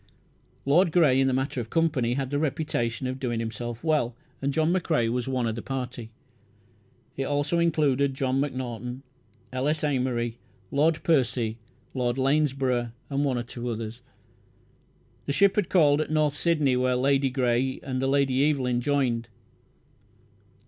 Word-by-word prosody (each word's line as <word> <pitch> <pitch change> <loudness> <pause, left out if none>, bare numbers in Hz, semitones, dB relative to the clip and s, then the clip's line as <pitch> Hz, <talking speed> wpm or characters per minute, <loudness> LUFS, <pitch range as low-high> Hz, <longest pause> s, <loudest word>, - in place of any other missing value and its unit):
Lord 165 +5 +4
Grey 150 -6 +4
in 135 - +3
the - - +2
matter 130 -1 -1
of 115 - -8
company 145 -8 +1
had 135 -1 -3
the 145 - 0
reputation 130 -6 -1
of 130 +1 -3
doing 120 -3 -2
himself 115 +2 -5
well. 150 -7 +1 0.3
John 160 +4 +1
McCrae 155 -10 +1
was 125 +1 -2
of 125 -4 0
the 115 - -5
party. 125 -3 -5 1.1
It 135 - -2
also 145 +4 0
included 140 -5 +2
John 135 0 0
Macnaughton, 125 -2 -4 0.5
L. 130 +2 -1
S. 155 +1 0
Amery, 125 -5 -1 0.3
Lord 155 +3 +2
Percy, 120 -7 +1 0.3
Lord 125 -1 -1
Lanesborough, 135 -4 +1 0.2
and 140 +1 +1
one 135 -3 0
or 120 - -2
two 120 0 -6
others. 115 +1 -5 1.3
The 140 - 0
ship 200 +4 +4
had 210 -4 0
called 150 -5 +4
at - - -3
North 155 -2 +2
Sydney 150 -4 +2
where 125 0 +1
Lady 135 +1 +2
Grey 130 0 0
and 130 -1 -3
the 135 - +1
Lady 135 +1 +3
Evelyn 125 -4 0
joined. 120 -4 0
135 Hz, 150 wpm, -26 LUFS, 120-145 Hz, 1.3 s, Lord